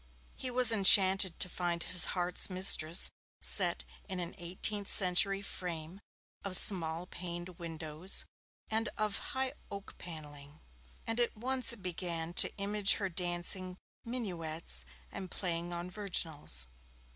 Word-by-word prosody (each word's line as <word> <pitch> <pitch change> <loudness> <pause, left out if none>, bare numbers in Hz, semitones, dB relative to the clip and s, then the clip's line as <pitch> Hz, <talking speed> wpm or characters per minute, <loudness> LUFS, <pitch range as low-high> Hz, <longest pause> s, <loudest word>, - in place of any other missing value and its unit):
He 260 - -3
was 250 -1 +7
enchanted 195 -3 +4
to - - +4
find 175 -1 -4
his 180 -2 +5
heart's 180 +2 0
mistress 185 -3 +4 0.3
set - - 0 0.3
in 190 -1 -4
an 175 -1 -7
eighteenth 190 +4 -3
century 195 +2 +5
frame 175 -1 -8 0.4
of 190 -2 +4
small 165 -3 +3
paned 175 0 -8
windows 165 +1 0 0.5
and 220 0 -1
of 210 -1 -2 0.2
high 265 0 -1 0.2
oak 200 0 -10
panelling, 150 -3 -11 0.5
and 225 +1 -4
at 240 -2 -2
once 255 +1 +4
began 175 -4 -4
to - - +3
image 200 0 +2
her 195 -3 -4
dancing 180 +1 -2 0.3
minuets 165 - -5 0.3
and 185 - -8
playing 175 -2 -4
on 175 0 -6
virginals. 165 - -2
180 Hz, 125 wpm, -31 LUFS, 170-200 Hz, 0.5 s, was